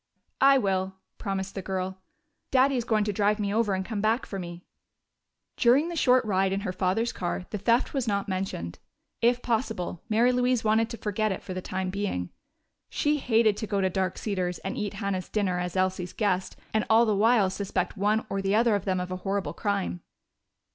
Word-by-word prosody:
"I 275 0 +7
will," 190 -4 0 0.2
promised 195 -2 -3
the 195 - -4
girl. 190 0 -3 0.5
"Daddy 270 +1 +4
is 240 -2 -1
going 215 -3 +2
to 210 0 -1
drive 210 +1 +2
me 200 -1 -1
over 215 -3 +2
and 190 0 -3
come 215 -2 -3
back 220 +3 +1
for 195 - -5
me." 175 0 -8 0.9
During 265 +7 +4
the 345 - -4
short 255 -5 +4
ride 190 -2 +1
in 195 +1 -1
her 185 - -2
father's 195 +6 0
car 180 0 -3
the 210 - -3
theft 235 +5 +2
was 265 -4 -1
not 200 -2 0
mentioned. 185 - -4 0.4
If 240 +1 +3
possible, 220 -7 -2
Mary 230 +3 +4
Louise 250 -1 +1
wanted 220 +1 +2
to 235 - -6
forget 215 0 -1
it 190 - -4
for 185 - -6
the 185 - -4
time 185 0 -3
being. 190 - -3 0.6
She 295 0 +1
hated 225 -5 +3
to 220 - -4
go 200 -1 0
to 190 -1 +1
Dark 185 -1 -1
Cedars 185 -4 -2
and 195 - -2
eat 205 -1 -3
Hannah's 195 -3 -3
dinner 190 -4 0
as 180 0 -3
Elsie's 185 -1 0
guest 190 -4 0 0.2
and 220 -1 +2
all 225 +2 +6
the 215 -2 +1
while 210 -2 +4
suspect 190 -1 -2
one 210 +2 +1
or 195 -2 -2
the 195 +1 +1
other 230 0 +4
of 200 -2 -1
them 185 -2 0
of 180 0 -4
a 185 - -2
horrible 195 +1 -2
crime. 200 -4 -2
200 Hz, 205 wpm, -27 LUFS, 185-225 Hz, 0.9 s, I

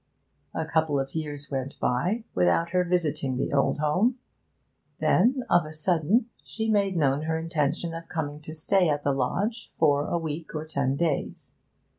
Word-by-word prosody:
A 160 - -1
couple 160 -2 +1
of 135 0 -4
years 150 -2 -4
went 135 0 -4
by 180 - 0
without 90 - +2
her 180 0 +3
visiting 150 -7 0
the 130 - -2
old 140 -1 +2
home; 180 - +2 0.8
then, 250 +7 +3
of 175 -1 +4
a 155 - -8
sudden, 175 - +1 0.2
she 220 0 -2
made 200 -3 +2
known 140 -2 +2
her 160 0 0
intention 165 0 -1
of 165 0 -8
coming 150 -2 -3
to 155 +1 -8
stay 180 +2 +2
at 145 -1 0
the 140 - +2
lodge 205 - -1
'for 145 -2 +3
a - - 0
week 160 -1 -5
or 155 0 -3
ten 140 -4 0
days.' 160 -2 -2
160 Hz, 170 wpm, -27 LUFS, 145-175 Hz, 0.8 s, of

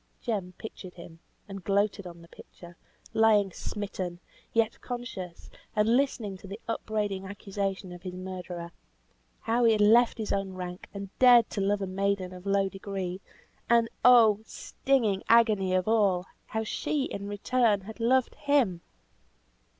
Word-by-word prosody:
Jem 195 -7 -3
pictured 185 -4 -9
him 170 -1 -12 0.3
(and 195 -2 -8
gloated 200 0 0
on 170 -1 -11
the - - -15
picture), 175 +1 -14 0.4
lying 215 -3 +4
smitten, 185 -3 -5 0.3
yet 225 -1 0
conscious; 240 -9 -7 0.2
and 215 +2 +3
listening 240 -7 0
to 195 - -12
the 200 +3 -7
upbraiding 210 -4 -2
accusation 195 -1 -4
of 175 0 -10
his 180 0 -7
murderer. 180 -2 -6 0.7
How 235 +2 +1
he 230 -1 +6
had 210 - +1
left 230 +4 +5
his 220 -2 -2
own 195 -1 -2
rank, 180 0 -7
and 200 -1 -8
dared 245 -3 +7
to 200 - -2
love 200 +1 +1
a - - 0
maiden 190 -1 -1
of 180 +2 -10
low 195 0 +2
degree; 195 -1 -5 0.5
and 235 -1 +4
oh! 230 -4 +7
stinging 220 -3 0
agony 215 -5 +4
of 185 +1 0
all 200 -5 +2 0.2
how 220 0 -2
she, 280 +6 -1
in 200 -6 -5
return, 210 0 +1
had 220 +4 -10
loved 250 +2 +2
him! 260 -12 +1
200 Hz, 150 wpm, -28 LUFS, 185-225 Hz, 0.7 s, dared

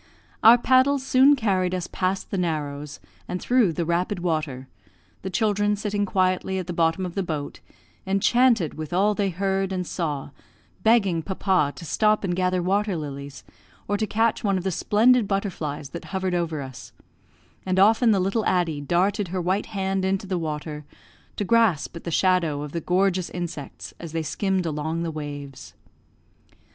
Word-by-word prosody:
Our 230 +2 +8
paddles 260 +2 +3
soon 270 +2 +5
carried 185 -7 0
us 180 -1 -3
past 185 +1 -2
the 195 - -1
narrows, 150 -4 -3 0.3
and 180 - -3
through 240 -7 +2
the 170 +1 -2
rapid 175 +4 0
water, 155 -7 -2 0.5
the 190 - -4
children 205 0 +1
sitting 205 0 -2
quietly 185 0 0
at 185 - -3
the 175 - -5
bottom 165 +2 +1
of 180 - -6
the 195 - -1
boat, 155 -5 -4 0.5
enchanted 215 - +3
with 155 +1 -7
all 200 +4 +3
they 200 -1 0
heard 195 +1 -1
and 185 -1 -2
saw, 150 -6 -3 0.5
begging 200 -7 +3
papa 185 -4 0
to 170 - -9
stop 215 +7 +2
and 180 -3 -1
gather 180 -1 0
water 200 +1 0
lilies, 140 -2 -7 0.4
or 205 - 0
to 215 +1 -1
catch 225 +1 +1
one 200 -2 +1
of 180 - -4
the 190 - -1
splendid 225 +5 +3
butterflies 165 -8 -3
that 170 - -8
hovered 190 -1 -2
over 165 -4 -1
us; 130 -1 -10 0.7
and 185 0 -1
often 220 +5 +5
the 205 -3 +4
little 195 +4 0
Addie 165 -5 0
darted 185 +6 +1
her 185 +2 -3
white 185 +3 -1
hand 195 -2 -2
into 190 +1 0
the 185 -2 -2
water 150 -1 -5 0.5
to - - -2
grasp 220 -9 +2
at 170 - -9
the - - -2
shadow 170 -4 +1
of 150 - -7
the 170 - -3
gorgeous 185 +1 +1
insects 170 -6 -6
as 165 -2 -8
they 165 -1 -1
skimmed 190 +3 -1
along 160 +1 -2
the 165 - -2
waves. 145 -3 -8
185 Hz, 175 wpm, -24 LUFS, 165-200 Hz, 0.7 s, Our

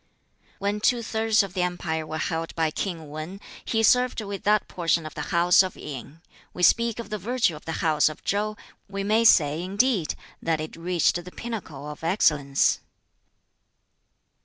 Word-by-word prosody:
"When 200 +1 -1
two 240 +1 +2
thirds 220 -1 +2
of 195 -2 -7
the 185 - -1
empire 170 -3 -2
were 155 - -4
held 165 +1 -3
by 160 -2 +1
King 165 -2 -4
Wan, 155 +6 -7 0.2
he 225 -1 0
served 250 +2 +4
with 200 -2 -5
that 210 0 +3
portion 165 -2 0
the 150 - -5
House 175 +1 +5
of 185 -1 -3
Yin. 145 +3 -8 0.3
We 180 - -3
speak 230 +3 +4
of 230 -3 -7
the 215 - -2
virtue 225 -4 +1
of 150 - -12
the 165 - -3
House 155 -1 +4
of 155 - -10
Chow; 210 +1 -1 0.3
we 200 0 -3
may 215 +3 +3
say, 155 -7 +5
indeed, 200 -1 +1 0.3
that 165 -2 0
it 155 0 -6
reached 175 0 +1
the 180 - -10
pinnacle 180 -13 -6
of 150 +1 -9
excellence." 150 -6 +2
180 Hz, 170 wpm, -25 LUFS, 160-215 Hz, 0.3 s, House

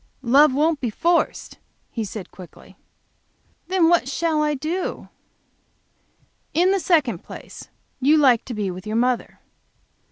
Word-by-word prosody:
"Love 275 +5 +5
won't 305 +3 +1
be 245 - -1
forced," 335 +10 -1 0.3
he 225 - -3
said, 205 -2 -8
quickly. 180 -1 -14 0.9
"Then 370 -3 +3
what 335 -6 +2
shall 315 +1 0
I 300 -1 0
do?" 325 +7 -4 1.5
"In 355 +4 +3
the 390 - +1
second 290 - +1
place, - - -11 0.3
you 290 +4 +4
like 260 -6 +4
to 245 - -6
be 205 -3 -2
with 185 +3 -9
your 215 - -3
mother. 245 +1 -1
280 Hz, 135 wpm, -22 LUFS, 230-330 Hz, 1.5 s, Love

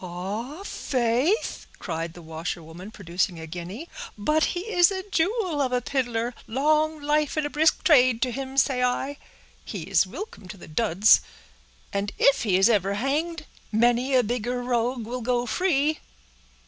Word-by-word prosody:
"Ah! 205 - -5
faith," 260 - 0
cried 165 -2 -4
the 175 - -11
washerwoman, 165 +3 -6
producing 180 -3 -2
a 160 - -7
guinea, 180 - -7 0.3
"but 305 +10 +2
he - - -2
is 360 -4 +4
a 380 0 -5
jewel 365 -3 0
of 260 -2 0
a 250 - +2
piddler! 245 -2 -2
Long 305 +5 +1
life 295 +1 0
and 305 - +1
a 290 - -3
brisk 315 +2 +2
trade 255 -6 +5
to 255 - -1
him, 270 +2 -6
say 265 -2 +3
I; 255 +3 0 0.5
he - - -6
is - - +2
wilcome 405 - -8
to 200 - -9
the - - -12
duds—and 170 - 0
if 275 0 +4
he 195 -5 +2
is 195 - +5
ever 200 -3 +2
hanged, 300 +7 -1 0.3
many 240 +4 +2
a 250 - +5
bigger 245 +2 -2
rogue 245 -1 -1
will 245 +2 -5
go 245 +1 0
free." 310 +1 +1
245 Hz, 160 wpm, -25 LUFS, 200-295 Hz, 0.5 s, trade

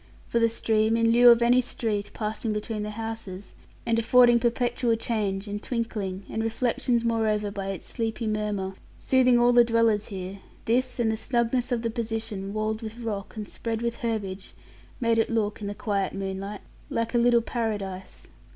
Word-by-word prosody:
For 235 - +1
the 230 0 +4
stream, 220 0 +1
in 230 0 +3
lieu 240 +1 +7
of 235 0 +6
any 245 +2 +5
street, 215 -4 -2
passing 220 0 -2
between 210 0 -3
the 210 - -3
houses, 215 -3 -6 0.3
and 230 0 +2
affording 240 +1 +6
perpetual 240 0 +1
change, 210 -3 -2
and 205 0 -4
twinkling, 210 -6 -3
and 220 - -3
reflections 235 +1 0
moreover 215 -3 +1
by 195 -1 -5
its 195 -3 -5
sleepy 225 0 -3
murmur 210 -3 -2 0.2
soothing 255 -2 +4
all 240 0 +5
the 240 0 +7
dwellers 230 -2 +2
there, 190 0 -6 0.3
this 250 +2 +1
and 225 -2 +2
the - - 0
snugness 240 +1 0
of 240 -1 0
the 230 - -1
position, 220 -4 -3
walled 215 +1 -2
with 225 0 -7
rock 215 -4 -5
and 210 -1 -5
spread 230 0 -4
with 235 0 -1
herbage, 205 -5 -4 0.5
made 230 -2 +2
it 225 - +2
look, 215 -2 -1
in 205 - -4
the 205 - -4
quiet 200 -3 -1
moonlight, 195 +1 -5 0.3
like 230 +1 -2
a 240 - +3
little 235 -1 +4
paradise. 205 -6 -4
225 Hz, 180 wpm, -26 LUFS, 205-235 Hz, 0.5 s, lieu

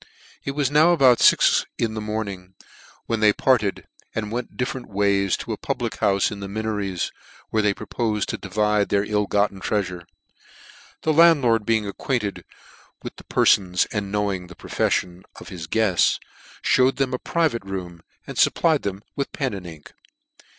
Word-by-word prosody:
It 140 - -3
was 140 -2 0
now 155 +4 +5
about 130 -7 +5
fix - - +5
in 115 -2 -1
the 110 - -4
morning, 100 -4 -5 0.5
when 115 - -1
they 105 -1 +5
parted, 110 -3 +1 0.3
and 105 -1 -3
went 120 +1 -5
dif 125 +1 -1
ferent 130 - -8
ways 100 -1 +1
to - - -6
a - - -5
public - - -3
houfe 100 -1 +2
in 105 - -6
the 100 - -6
Minorits^ 105 -3 -3 0.4
where 110 - +2
they 105 -1 +1
propo'fed 110 -4 -2
to - - -4
divide 105 +1 0
their 100 0 +2
ill 105 -1 0
gotten 100 -1 0
treafure. 90 -5 -2 1.0
The 160 - +2
landlord 140 -10 +5
being 110 -2 +2
acquainted 105 +1 -3 0.6
with - - -8
the - - -13
perfons, 90 -3 +3
and 100 -2 -3
knowing 100 -3 -1
the 90 - -13
profefllon 90 +1 -1 0.2
of" - - -11
his 85 -2 -7
guefts, 100 -2 +2 0.4
fhewed 130 +1 +3
them 135 -2 -1
a 125 - -1
private 155 - 0
room, 90 -3 -6 0.2
and - - -8
fupplied 160 -4 +3
them 100 0 -4
with 140 - -3
pen 130 -5 -2
and 95 -3 -7
ink. 80 -3 -12
105 Hz, 170 wpm, -23 LUFS, 95-120 Hz, 1.0 s, now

